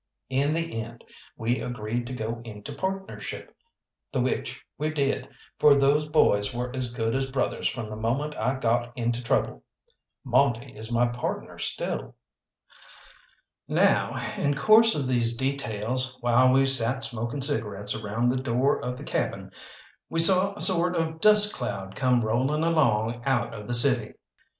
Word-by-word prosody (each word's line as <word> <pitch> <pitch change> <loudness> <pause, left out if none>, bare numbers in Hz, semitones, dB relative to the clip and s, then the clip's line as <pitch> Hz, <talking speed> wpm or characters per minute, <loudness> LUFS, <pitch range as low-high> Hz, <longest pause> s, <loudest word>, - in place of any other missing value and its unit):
In 140 +4 +1
the 165 -9 -3
end 115 +1 -11 0.3
we 115 +1 -1
agreed 120 0 -4
to 130 - -6
go 115 -1 -5
into 105 -3 -9
partnership, 190 0 -6 0.6
the - - -2
which - - -3
we 155 +1 -2
did, 140 -3 -2 0.3
for 145 -1 +6
those 140 +2 +2
boys 115 -8 +2
were 125 +1 -4
as 125 -2 -2
good 115 -2 -2
as 135 0 -1
brothers 130 -1 -1
from 115 -3 -4
the 110 - -7
moment 130 +8 -2
I 125 +5 -1
got 120 +1 -1
into 120 0 -2
trouble. 125 - -1 0.6
Monte 130 -1 0
is 110 +2 -8
my 120 +1 +2
partner 120 0 -5
still. - - -4 1.5
Now, - - +2 0.2
in 145 0 0
course 220 +7 +5
of 145 -3 -1
these 120 -2 +1
details, 130 -1 -2
while 120 +2 +4
we 135 +1 +4
sat 130 0 +3
smoking 120 +4 -2
cigarettes 105 -8 -3
around 110 +3 -2
the 130 +1 -1
door 130 +2 0
of 125 0 -4
the - - -9
cabin, - - -3 0.6
we 165 - -1
saw 190 +3 +7
a - - -2
sort 180 -1 +4
of 160 -1 -3
dust 210 0 +5
cloud 95 -6 -5
come 125 -2 +2
rolling 130 +8 0
along 120 -8 +1
out 135 -2 -1
of 105 -2 -9
the 120 - +1
city. 120 - +4
125 Hz, 155 wpm, -26 LUFS, 115-145 Hz, 1.5 s, saw